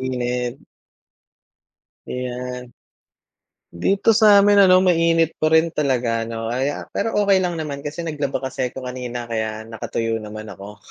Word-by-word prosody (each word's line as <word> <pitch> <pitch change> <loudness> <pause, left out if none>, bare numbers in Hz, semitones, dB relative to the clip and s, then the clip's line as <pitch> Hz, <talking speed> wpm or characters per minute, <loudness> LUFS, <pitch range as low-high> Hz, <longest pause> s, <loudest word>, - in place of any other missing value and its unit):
mainit. 125 -1 -3 1.4
Ayan. 125 0 -5 1.0
Dito 195 - +2
sa'min 205 -2 +6
ano, 185 -1 +6
mainit 165 -2 +3
pa 155 - +3
rin 160 +1 +3
talaga 125 -6 0
'no, 115 0 -4
kaya 135 +4 -2
pero 225 - -1
okey 200 -1 +4
lang 175 -2 -1
naman 150 -3 -4
kasi 150 +3 -6
naglaba 145 -4 -2
kasi 130 -1 -2
ako 130 +1 -9
kanina 125 -1 -5
kaya 110 -1 -3
nakatuyo 115 0 -3
naman 110 0 -8
ako. 100 +2 -11
130 Hz, 130 wpm, -21 LUFS, 120-165 Hz, 1.4 s, sa'min